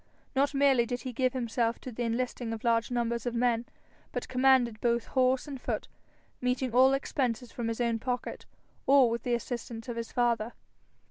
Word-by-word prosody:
For 265 - 0
not 280 +1 +2
merely 270 -4 +4
did 245 0 -3
he 255 +1 -5
give 255 +1 +1
himself 235 -2 0
to 255 - -7
the 245 - -6
enlisting 235 0 -2
of 220 - -7
large 230 -1 +2
numbers 235 -1 -1
of 240 - -2
men, 240 0 +1 0.4
but - - -4
commanded 255 -3 +3
both 235 -1 +1
horse 260 +1 +2
and 275 -3 -7
foot, - - -3 0.5
meeting 250 0 0
all 260 +2 +6
expenses 250 -3 -1
from 235 -2 -3
his 230 0 -3
own 235 -2 +1
pocket, 250 +1 -4 0.4
or 270 -4 +6
with 235 - -2
the 245 -1 0
assistance 235 -1 -5
of 235 - -4
his 230 -1 -4
father. 235 -2 +1
245 Hz, 190 wpm, -30 LUFS, 230-255 Hz, 0.5 s, all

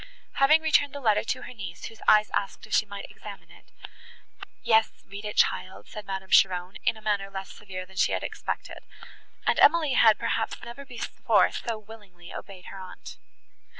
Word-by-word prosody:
Having 305 +4 +5
returned 290 -3 +3
the 285 - -5
letter 215 -6 +2
to - - -3
her - - -8
niece, 185 -6 -8
whose 225 - -10
eyes 215 0 +5
asked 200 - -2
if - - -9
she 215 - +3
might 200 0 -7
examine - - -11
it, - - -19 0.9
"Yes, 220 0 +4 0.2
read 200 +2 -9
it, 210 - -4
child," 185 - +1
said 210 -1 -9
Madame 190 -1 -5
Cheron, 180 0 +4
in - - +1
a 215 - -15
manner 200 -2 0
less 195 -1 -7
severe 185 -3 -8
than 190 +1 -17
she - - +3
had - - -1
expected, - - -5 0.7
and - - +2
Emily 310 -2 +5
had, 220 -4 +6
perhaps, 225 - -1
never 240 +4 -9
before 245 -3 +1
so 230 -2 -4
willingly 205 -5 -13
obeyed 190 -3 -9
her 195 - -9
aunt. 185 -1 -10
210 Hz, 185 wpm, -27 LUFS, 190-230 Hz, 0.9 s, had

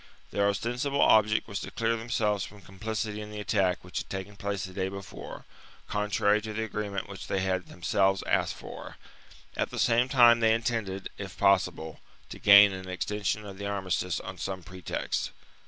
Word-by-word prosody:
Their 100 0 +2
ostensible 125 +7 -1
object 110 -3 +4
was 100 -2 -4
to - - -6
clear 115 0 0
themselves 110 -3 0
from 105 +1 -10
complicity 105 +3 -4
in 105 - -7
the 105 0 -7
attack 95 -3 +1
which 90 - -4
had - - -7
taken 95 +1 -6
place 100 -1 -3
the 95 - -10
day 95 0 -1
before, 100 -1 -9 0.4
contrary 105 0 +1
to 110 0 -6
the 110 +1 -2
agreement 105 -3 -4
which 100 -1 -8
they 95 - 0
had 95 -1 -1
themselves 95 +2 +1
asked - - +1
for; - - -9 0.6
at - - -1
the - - -7
same 120 +2 +3
time 120 -3 +7
they 110 -1 +4
intended, 110 -5 -2
if 100 -2 -7
possible, 90 -5 +1 0.3
to - - -9
gain 100 0 +8
an 95 0 -7
extension 105 +3 -2
of 100 -1 -9
the 100 - -3
armistice 95 -3 -1
on - - -8
some 95 -2 -4
pretext. 90 +2 -3
100 Hz, 180 wpm, -28 LUFS, 95-110 Hz, 0.6 s, gain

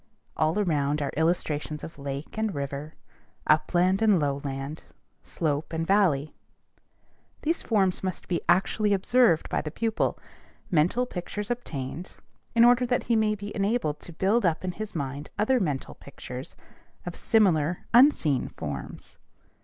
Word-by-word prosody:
All 155 +5 +1
around 150 -7 +1
are 140 - -3
illustrations 155 -1 -1
of 160 - -9
lake 140 +1 -6
and 220 -2 -1
river, 140 +2 -5 0.5
upland 180 +5 +3
and 210 -5 +4
lowland, 140 0 -3 0.4
slope 150 -1 -2
and 165 0 -1
valley. 165 -7 +2 1.1
These 325 +2 0
forms 195 -5 +1
must 185 -1 -4
be 175 - -1
actually 200 +3 +3
observed 200 -2 +3
by - - -1
the 150 - -5
pupil, 220 +7 -1 0.5
mental 180 +10 +2
pictures 205 +1 -5
obtained, 165 - -5 0.4
in 230 0 +7
order 245 +1 +5
that 245 0 +1
he 235 - +1
may 215 -1 +2
be 205 0 -7
enabled 200 -7 0
to - - -10
build 195 +8 +1
up 170 -2 +1
in 180 - -1
his 215 +2 -7
mind 140 -1 -4
other 245 +5 +3
mental 145 - -2
pictures - - -9 0.5
of 175 - -5
similar 180 -7 +2
unseen 235 - +5
forms. - - -7
175 Hz, 140 wpm, -27 LUFS, 150-215 Hz, 1.1 s, in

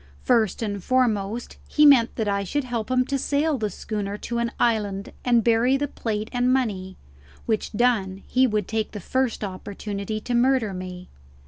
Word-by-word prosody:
First 225 -3 +2
and 200 -3 -3
foremost 235 -3 0
he 300 - +4
meant 260 -5 +6
that 220 -3 -1
I 200 0 0
should 290 +9 -1
help 240 -3 -3
him 255 0 +2
to 275 +1 -1
sail 290 +1 +1
the 215 -1 -1
schooner 205 +1 -4
to 235 +2 -3
an 235 0 -1
island 205 -4 0
and 240 -2 +3
bury 235 +4 +3
the 290 +1 -1
plate 215 -4 -3
and 245 0 +2
money; 200 -8 -1 0.5
which 220 -2 -1
done 210 -5 +1
he 255 +1 +3
would 210 -4 -1
take 220 -1 -2
the 210 - -5
first 255 +3 -1
opportunity 200 +2 -5
to 245 - -4
murder 240 -3 +2
me. 180 0 -7
225 Hz, 180 wpm, -24 LUFS, 205-250 Hz, 0.5 s, meant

